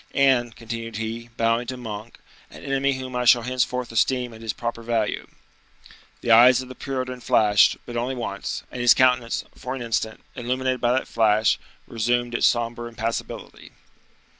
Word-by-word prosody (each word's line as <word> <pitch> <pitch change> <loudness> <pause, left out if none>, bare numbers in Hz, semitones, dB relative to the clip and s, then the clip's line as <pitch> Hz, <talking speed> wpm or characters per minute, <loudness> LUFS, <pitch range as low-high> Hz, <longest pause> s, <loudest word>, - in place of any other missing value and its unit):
"And," 130 -4 +3
continued 115 -1 -6
he, 115 +1 -5
bowing 115 +1 +1
to 130 - -4
Monk, 110 -2 -7 0.3
"an - - -13
enemy 135 0 +1
whom 130 -1 -6
I 125 - 0
shall 120 0 +6
henceforth 125 0 -1
esteem 125 +1 +1
at 110 - -12
his 115 -1 -2
proper 115 +2 -5
value." 115 -2 -1 0.9
The 120 - 0
eyes 120 +2 +8
of 130 -1 -7
the - - -7
Puritan 130 -2 -4
flashed, 105 -3 +4
but 120 - -8
only 125 +3 -1
once, 100 -5 -4
and 125 - -5
his 120 - +6
countenance, 125 -2 +2
for 130 0 -5
an 130 - -5
instant, 110 -1 -2
illuminated 130 +1 -1
by 120 0 +3
that 130 - -1
flash, 110 -2 +2 0.3
resumed 120 +1 -1
its - - +4
somber 120 0 -1
impassibility. 115 0 -5
120 Hz, 165 wpm, -24 LUFS, 115-125 Hz, 0.9 s, eyes